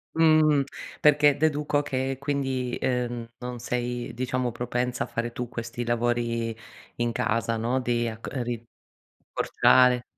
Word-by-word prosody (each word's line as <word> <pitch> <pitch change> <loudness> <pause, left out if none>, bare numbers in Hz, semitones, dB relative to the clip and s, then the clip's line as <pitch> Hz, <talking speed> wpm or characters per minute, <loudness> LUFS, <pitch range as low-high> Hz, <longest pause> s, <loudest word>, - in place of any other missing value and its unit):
Mh. 155 -3 +5 0.4
Perché 145 -1 +5
deduco 150 -1 +1
che 135 -2 -2
quindi, 135 -3 -1
ehm, 120 -2 -1
non 125 -1 -6
sei 120 0 -3
diciamo 125 0 -1
propensa 125 +1 -2
a - - -13
fare 120 +1 -3
tu 125 +1 -4
questi 115 0 -5
lavori 120 -1 0 0.4
in 120 0 0
casa, 115 -1 0
no. 120 +4 0
Di 120 -2 0
acco 110 0 -7
ehm, 130 - -2
ri 120 -1 -4 0.7
portare 125 -1 +4
125 Hz, 135 wpm, -26 LUFS, 120-135 Hz, 0.7 s, Mh